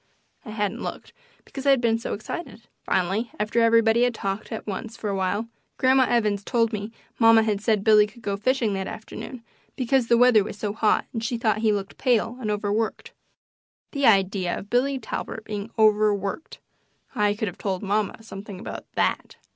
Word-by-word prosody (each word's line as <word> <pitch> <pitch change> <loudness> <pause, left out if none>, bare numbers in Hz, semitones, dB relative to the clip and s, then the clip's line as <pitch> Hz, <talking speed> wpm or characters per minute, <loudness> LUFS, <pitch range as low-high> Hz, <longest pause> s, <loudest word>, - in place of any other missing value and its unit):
I 240 - -10
hadn't 210 -2 -2
looked, - - -7 0.3
because 275 0 -6
I - - +6
had 270 -2 +5
been 230 -1 +1
so - - -3
excited. 230 +3 -7 0.2
Finally, 195 +6 0
after 215 +3 +1
everybody 230 0 +4
had 245 -1 +2
talked 195 +1 -4
at 220 - -5
once 215 +2 -5
for 210 - -3
a - - -1
while. 195 +4 -1 0.3
Grandma 260 0 +4
Evans 210 -4 +1
told 230 -1 +1
me 210 +1 -4 0.3
mamma 225 -1 +6
had 210 -2 -1
said 215 -2 +1
Billy 210 -1 +6
could 230 +2 -17
go 200 -1 -1
fishing 230 0 0
that 190 -1 -3
afternoon, 230 +2 -8 0.3
because 260 -1 +1
the 235 - +4
weather 245 -4 +6
was 205 - -7
so 205 -1 -3
hot 215 -1 +2
and 225 -2 -3
she 235 +1 -1
thought 220 -2 +1
he 220 -1 +2
looked 200 -2 -4
pale 240 -2 +1
and 215 - -2
overworked. 210 +1 -2 0.8
The 280 -2 +2
idea 195 -3 +2
of 200 - -10
Billy 265 +3 +2
Talbert 220 -3 -6
being 210 +1 -5
overworked! 210 - +1 0.6
I 205 0 +1
could 215 +1 -2
have 180 - -7
told 190 -2 -2
mamma 210 +2 -1
something 200 -2 -9
about - - -8
THAT. - - -1
220 Hz, 185 wpm, -24 LUFS, 205-235 Hz, 0.8 s, I